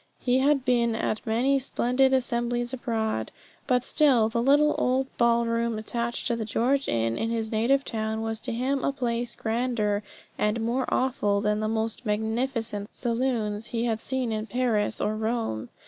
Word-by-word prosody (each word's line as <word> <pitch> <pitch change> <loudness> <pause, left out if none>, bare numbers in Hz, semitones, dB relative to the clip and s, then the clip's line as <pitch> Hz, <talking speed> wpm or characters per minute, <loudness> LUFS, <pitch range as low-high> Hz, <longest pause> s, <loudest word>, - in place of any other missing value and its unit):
He 250 0 +1
had 275 -1 +2
been 235 -2 +2
at 215 -1 -2
many 255 +5 +2
splendid 260 0 +1
assemblies 240 -1 0
abroad, 220 - -2 0.4
but 250 -1 +2
still 260 -8 +4
the 235 +1 0
little 290 +4 +4
old 260 +1 0
ballroom 235 -1 +2
attached 235 +2 -3
to 235 - +1
the 230 - -3
George 250 +6 0
Inn 115 0 0
in 225 - -1
his 225 -1 -2
native 245 +5 +2
town 220 -1 -2
was 225 -1 -3
to - - -4
him 260 +3 -1
a - - +2
place 240 -3 -2
grander 220 -3 0 0.4
and 210 +2 +1
more 235 +3 0
awful 225 -6 +1
than 210 0 0
the 215 - -1
most 220 +1 -2
magnificent 220 -1 -1
saloons 230 -3 -1
he 230 0 -2
had 225 -2 -1
seen 260 -3 -2
in 215 0 -3
Paris 235 -4 0
or 215 - 0
Rome. 220 - -2
235 Hz, 165 wpm, -26 LUFS, 220-255 Hz, 0.4 s, still